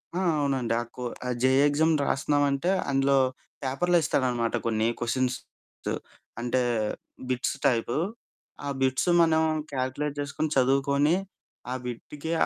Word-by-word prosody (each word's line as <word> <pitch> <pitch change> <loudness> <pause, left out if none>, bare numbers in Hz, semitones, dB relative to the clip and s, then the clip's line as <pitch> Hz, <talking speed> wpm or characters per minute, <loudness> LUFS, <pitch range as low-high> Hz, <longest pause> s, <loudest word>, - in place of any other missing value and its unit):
ఆ! - - 0 0.2
అవునండి. 130 -5 0
ఆ - - -3
కో 125 - -6 0.2
ఆ - - -1
జేఈ 130 +1 +5
ఎగ్జామ్ 160 +3 +3
రాస్తున్నామంటే 145 +4 +1 0.2
అందులో 135 0 +3 0.5
పేపర్‌లో 175 +7 +2
ఇస్తాడనమాట 125 -5 +1
కొన్ని 110 -1 +1
క్వెషన్స్. 125 +1 0 1.0
అంటే 125 +2 +1 0.7
బిట్స్ 130 +2 0
టైపు, 120 -2 +1 0.7
ఆ - - -3
బిట్స్ 130 +6 +2
మనం 160 -1 +4 0.3
కాలిక్యులేట్ 140 +2 -2
చేసుకొని, 145 +2 -2
చదువుకొని 140 +4 +3 0.6
ఆ - - 0
బిట్టుకి 145 +6 -6
135 Hz, 115 wpm, -27 LUFS, 125-145 Hz, 1.0 s, జేఈ